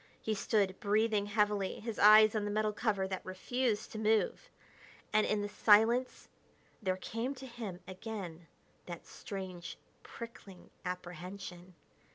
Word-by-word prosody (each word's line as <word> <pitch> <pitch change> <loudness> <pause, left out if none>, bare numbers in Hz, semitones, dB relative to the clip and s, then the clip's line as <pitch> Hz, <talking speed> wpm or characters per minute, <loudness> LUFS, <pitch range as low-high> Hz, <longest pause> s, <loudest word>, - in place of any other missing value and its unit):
He 220 - -1
stood, 200 -2 +1
breathing 210 0 +2
heavily, 210 -2 +1
his 225 -1 -5
eyes 215 +1 +8
on 215 -2 0
the 205 - -2
metal 215 0 0
cover 205 -3 0
that 190 -1 -4
refused 220 +4 -1
to 215 - -5
move. 220 - +1 0.6
And 215 0 +4
in 210 -1 +1
the - - -1
silence 225 +4 +4 0.5
there 185 -3 0
came 230 +8 -3
to 265 0 -9
him 225 -7 -7
again 185 -4 -7 0.4
that 175 -1 -7
strange, 185 -3 -7 0.2
prickling 215 -5 -11
apprehension. 180 0 -7
205 Hz, 135 wpm, -33 LUFS, 185-220 Hz, 0.6 s, eyes